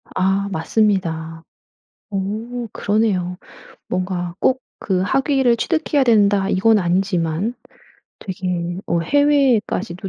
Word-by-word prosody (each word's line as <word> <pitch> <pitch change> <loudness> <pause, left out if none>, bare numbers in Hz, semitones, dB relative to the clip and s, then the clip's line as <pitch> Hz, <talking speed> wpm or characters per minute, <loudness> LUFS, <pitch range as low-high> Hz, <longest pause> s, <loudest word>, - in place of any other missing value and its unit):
아 195 +2 +1
맞습니다. 165 -3 -1 0.7
어 220 +5 -3
그러네요. 200 -4 0 0.5
뭔가 180 -1 -2
꼭 260 0 +2 0.2
그 185 -3 0
학위를 265 +1 +2
취득해야 315 -2 +1
된다 205 -4 +3
이건 215 +4 +3
아니지만 180 +2 0 0.6
되게 180 -2 -4
어 170 - +1
해외에까지도 245 - +1
195 Hz, 225 characters per minute, -20 LUFS, 180-230 Hz, 0.7 s, 된다